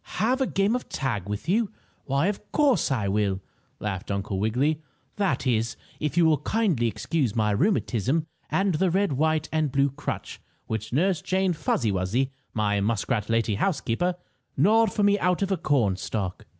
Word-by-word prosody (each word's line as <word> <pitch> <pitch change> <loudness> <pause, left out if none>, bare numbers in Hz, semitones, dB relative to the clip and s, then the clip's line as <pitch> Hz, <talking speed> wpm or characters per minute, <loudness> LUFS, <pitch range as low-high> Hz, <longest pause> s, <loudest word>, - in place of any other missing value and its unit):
"Have 245 +7 +2
a 265 - +2
game 195 +4 +1
of 250 - -4
tag 105 -8 -2
with 105 +8 -4
you? 210 +4 +2 0.4
Why, 140 +3 +1
of 205 +1 -3
course, 280 - +3
I 110 -7 0
will!" 100 -1 +1 0.4
laughed 95 -3 -4
Uncle 100 -1 -2
Wiggily. 130 +9 +1 0.4
"That 195 -7 0
is, 115 -3 0 0.2
if 150 +2 -2
you 170 - +6
will 155 -3 +4
kindly 170 - +1
excuse 130 0 -1
my 105 -2 +2
rheumatism, 145 - +1 0.2
and 195 -1 +1
the 180 +4 +2
red, 195 -1 +1
white 155 +2 +1
and 155 -3 +1
blue 140 0 +2
crutch 140 - -5 0.2
which 110 0 -4
Nurse 175 +6 +2
Jane 190 -1 +1
Fuzzy 120 -7 0
Wuzzy, 100 +9 0 0.2
my 105 -2 +1
muskrat 105 +1 0
lady 115 -1 +1
housekeeper, 175 - 0 0.4
gnawed 215 +8 +4
for 205 - 0
me 205 0 +4
out 180 +2 +1
of 195 - -1
a 190 - +2
cornstalk." 105 - -1
140 Hz, 170 wpm, -26 LUFS, -, 0.4 s, you